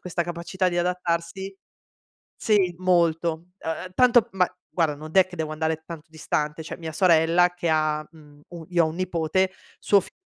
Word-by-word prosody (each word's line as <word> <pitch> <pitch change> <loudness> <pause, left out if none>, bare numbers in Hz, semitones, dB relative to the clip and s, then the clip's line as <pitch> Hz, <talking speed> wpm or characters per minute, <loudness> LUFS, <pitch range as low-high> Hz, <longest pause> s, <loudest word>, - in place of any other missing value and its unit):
questa 175 -1 -2
capacità 175 +2 -2
di 175 - -3
adattarsi 180 +2 -2 0.8
sì, 195 -5 +2
molto 170 -2 +1
ehm, 180 +2 -5
tanto 240 -1 +5
ma 185 -2 +2 0.2
guarda, 160 -4 0
non 155 +2 -10
è 190 -1 +6
che 185 -1 -11
devo 155 -1 -3
andare 160 0 -2
tanto 165 -2 -9
distante. 150 0 -2
Cioè, 160 - -7
mia 160 -2 -7
sorella 170 +1 +4
che 175 -1 -3
ha, 155 -1 +1
mhmm, 150 -3 -18
u 170 -2 -10
io 175 -2 +3
ho - - 0
1 155 - -6
nipote, 185 +1 0 0.3
suo 200 - +4
figlio - - -14
170 Hz, 175 wpm, -24 LUFS, 160-185 Hz, 0.8 s, è